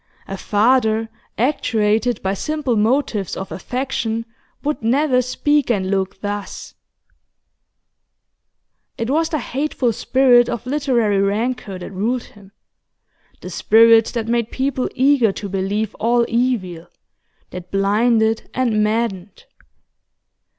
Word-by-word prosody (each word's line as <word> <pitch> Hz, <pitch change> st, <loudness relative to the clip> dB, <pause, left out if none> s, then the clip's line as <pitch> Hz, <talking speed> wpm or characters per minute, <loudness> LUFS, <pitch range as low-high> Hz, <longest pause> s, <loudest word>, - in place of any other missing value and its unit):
A 195 Hz, -, -5 dB
father 220 Hz, +2 st, +1 dB, 0.3 s
actuated 225 Hz, -3 st, 0 dB
by 190 Hz, 0 st, 0 dB
simple 285 Hz, +3 st, -2 dB
motives 215 Hz, -, 0 dB
of 190 Hz, -, -6 dB
affection 230 Hz, 0 st, -3 dB, 0.4 s
would 295 Hz, +1 st, -2 dB
never 255 Hz, +3 st, +2 dB
speak 290 Hz, +3 st, 0 dB
and 190 Hz, -5 st, 0 dB
look 190 Hz, 0 st, -2 dB
thus. 205 Hz, -1 st, -5 dB, 2.2 s
It 230 Hz, +3 st, -2 dB
was 320 Hz, +2 st, +1 dB
the 310 Hz, -, -1 dB
hateful 270 Hz, -4 st, -1 dB
spirit 245 Hz, +1 st, +3 dB
of 235 Hz, -, -4 dB
literary 250 Hz, -7 st, +1 dB
rancour 205 Hz, 0 st, -1 dB
that 180 Hz, -, -8 dB
ruled 230 Hz, +6 st, -1 dB
him; 200 Hz, -2 st, -17 dB, 0.9 s
the -, -, -8 dB
spirit 225 Hz, 0 st, +5 dB
that 225 Hz, -2 st, -2 dB
made 235 Hz, -1 st, 0 dB
people 265 Hz, -1 st, -2 dB
eager 260 Hz, -4 st, +3 dB
to 205 Hz, -, -6 dB
believe 195 Hz, +2 st, -2 dB
all 235 Hz, +1 st, +2 dB
evil, 215 Hz, -9 st, -1 dB, 0.6 s
that 180 Hz, 0 st, -8 dB
blinded 220 Hz, +3 st, +1 dB
and 230 Hz, -4 st, +1 dB
maddened. 210 Hz, -3 st, -2 dB
230 Hz, 115 wpm, -19 LUFS, 205-255 Hz, 2.2 s, spirit